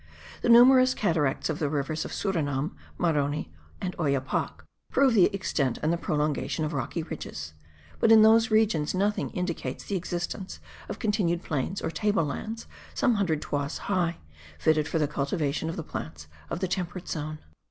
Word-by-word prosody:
The - - 0
numerous 255 +2 +7
cataracts 160 -9 +1
of 155 -2 -2
the 150 - 0
rivers 150 +2 -2
of - - -6
Surinam, 155 -5 -1 0.3
Maroni 150 - 0 0.3
and 180 -1 -4
Oyapoc, 140 -5 -1 0.3
prove 270 -3 +4
the 195 -6 +6
extent 160 - -1
and 155 +2 +2
the - - 0
prolongation 150 0 -1
of 155 - -3
rocky 155 +4 -2
ridges; 80 - -7 0.5
but 225 - +4
in 220 -1 +9
those 225 +1 +6
regions 215 -8 +2
nothing 205 +3 0
indicates 170 -8 -4
the 200 - -3
existence 175 +2 -4 0.3
of - - -4
continued 200 -6 0
plains 155 +6 -2
or - - -1
table 205 -4 +1
lands 220 +10 -5 0.3
some 245 - +3
hundred 175 -8 0
toises 145 +1 -2
high, 170 -3 +1 0.4
fitted 155 - +2
for - - -1
the 150 -2 +2
cultivation 150 +2 -1
of 165 - -4
the 165 - -4
plants 75 - -7 0.2
of - - -4
the 190 - +1
temperate 180 0 -4
zone. 155 -1 -4
165 Hz, 165 wpm, -27 LUFS, 150-200 Hz, 0.5 s, in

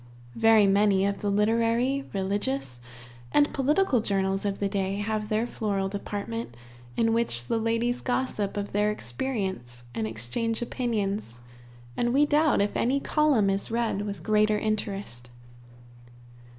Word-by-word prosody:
Very 225 -2 +5
many 195 0 +3
of 200 0 -1
the 205 - 0
literary, 230 +6 +1
religious, 200 - -2 0.5
and 290 0 +3
political 285 +1 +2
journals 195 -1 0
of 200 -1 -1
the 200 - 0
day 195 -1 -1
have 210 +1 -2
their 220 +2 +1
floral 200 -5 -2
department, 205 - -5 0.4
in 225 -1 +2
which 225 - +1
the 225 - 0
ladies 230 +2 0
gossip 245 -6 -1
of 205 0 -3
their 210 +1 +2
experience 125 - -4
and 110 -2 -2
exchange 120 - -2
opinions, 210 - -2 0.6
and 240 +1 0
we 290 +1 +5
doubt 295 -4 +3
if 205 - -1
any 265 +4 +1
column 285 -8 +2
is 195 +1 -2
read 230 -3 0
with 200 -5 -5
greater 215 +1 +3
interest. 200 - -3
210 Hz, 135 wpm, -27 LUFS, 195-235 Hz, 0.6 s, Very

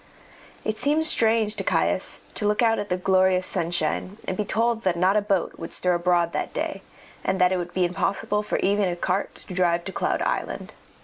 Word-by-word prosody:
It 215 0 -2
seemed 300 +3 +2
strange 225 -6 +2
to - - -2
Caius - - 0
to 210 - -1
look 210 +3 +2
out 225 -1 +3
at 205 - -4
the 180 - 0
glorious 185 0 +3
sunshine 175 +2 -2
and 185 - -1
be 210 - -1
told 230 +2 0
that 185 -2 +1
not 185 +3 +3
a 210 - +4
boat 200 -3 -1
would 165 - -1
stir 180 -1 +3
abroad 175 -1 +2
that - - -3
day, - - -3 0.4
and 190 +1 0
that 180 0 +4
it 185 - +1
would 175 0 -4
be 185 -1 +3
impossible 195 +3 -1
for 210 - -2
even 200 -1 +2
a 175 - -2
cart 185 +2 -1
to 185 - -10
drive 175 -2 +2
to 190 - -4
the - - -20
Cloud - - 0
Island. - - -3
190 Hz, 220 wpm, -25 LUFS, 180-210 Hz, 0.4 s, a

